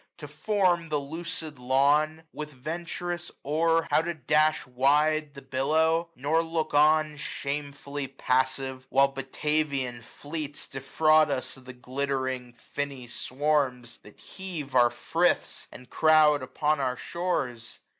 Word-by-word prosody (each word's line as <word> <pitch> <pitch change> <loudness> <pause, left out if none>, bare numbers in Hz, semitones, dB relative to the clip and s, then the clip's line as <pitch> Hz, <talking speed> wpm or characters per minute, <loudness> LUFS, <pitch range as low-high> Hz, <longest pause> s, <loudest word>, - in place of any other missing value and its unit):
To 150 - -8
form 175 +2 +1
the 150 - +1
lucid 160 0 -5
lawn; 145 +5 +2
with 150 0 -6
venturous 170 +5 -5
oar 165 +3 +2
How - - +5
to 170 +1 -3
dash 155 +2 +2
wide 145 +4 +2
the 140 - -10
billow; 160 +6 +1
nor 150 +5 +1
look 160 -2 -2
on. 155 +1 +4
Shamefully 140 -1 -4
passive, 130 0 -1
while 135 +1 +4
Batavian 135 -2 -2
fleets 145 +5 -6
Defraud 155 +3 +3
us 130 -2 -2
of 130 - -16
the 130 - -9
glittering 130 0 -3
finny 135 +2 -5
swarms, 130 -1 -1
920 105 - -13
That - - -29
heave 170 -8 -7
our 120 -1 +6
friths, 165 +8 0
and 125 - -12
crowd 155 -2 +4
upon 150 +3 0
our 130 -2 -1
shores 130 -11 -3
145 Hz, 130 wpm, -27 LUFS, 130-155 Hz, -, our